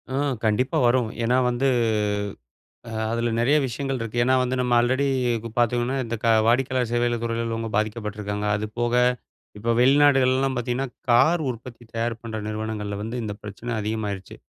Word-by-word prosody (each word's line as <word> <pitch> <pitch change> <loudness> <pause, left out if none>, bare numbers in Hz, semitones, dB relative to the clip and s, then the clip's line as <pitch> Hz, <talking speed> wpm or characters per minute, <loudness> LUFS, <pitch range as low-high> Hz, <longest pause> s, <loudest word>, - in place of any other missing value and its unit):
ம். 140 -2 0
கண்டிப்பா 125 +5 +1
வரும். 120 -2 +2
ஏன்னா 125 +2 +2
வந்து, 125 +3 0 1.2
அ - - -8 0.2
அதில 115 0 0
நெறைய 140 +6 +4
விஷயங்கள் 135 +2 -3
இருக்கு. 115 +1 -5
ஏன்னா, 130 +1 +3
வந்து 125 +1 -1
நம்ம 125 -1 0
ஆல்ரெடி 130 +4 +2 0.3
இப்ப 115 0 -7
பார்த்தீங்கன்னா, 120 +2 +1
இந்த 115 0 -3
க - - +2 0.2
வாடிக்கையாளர் 125 0 +1
சேவைகள் 120 -1 0
துறையில 115 0 -1
உள்ளவுங்க 115 0 -3
பாதிக்கப்பட்டுருக்காங்க. 105 -1 -3
அது 105 0 -3
போக 120 0 0 0.6
இப்ப 115 +3 -1
வெளிநாடுகள்லல்லாம் 135 -1 +4
பார்த்தீங்கன்னா, 125 +2 -1 0.2
கார் 155 +8 +4
உற்பத்தி 120 0 -8
தயார் 115 0 -1
பண்ற 110 -2 -5
நிறுவனங்கள்ல 110 -1 -4
வந்து 115 +3 -5
இந்த 105 - -3
பிரச்சனை 105 +4 -7
அதிகமாயிருச்சு. 105 -3 -4
120 Hz, 155 wpm, -24 LUFS, 110-130 Hz, 1.2 s, நெறைய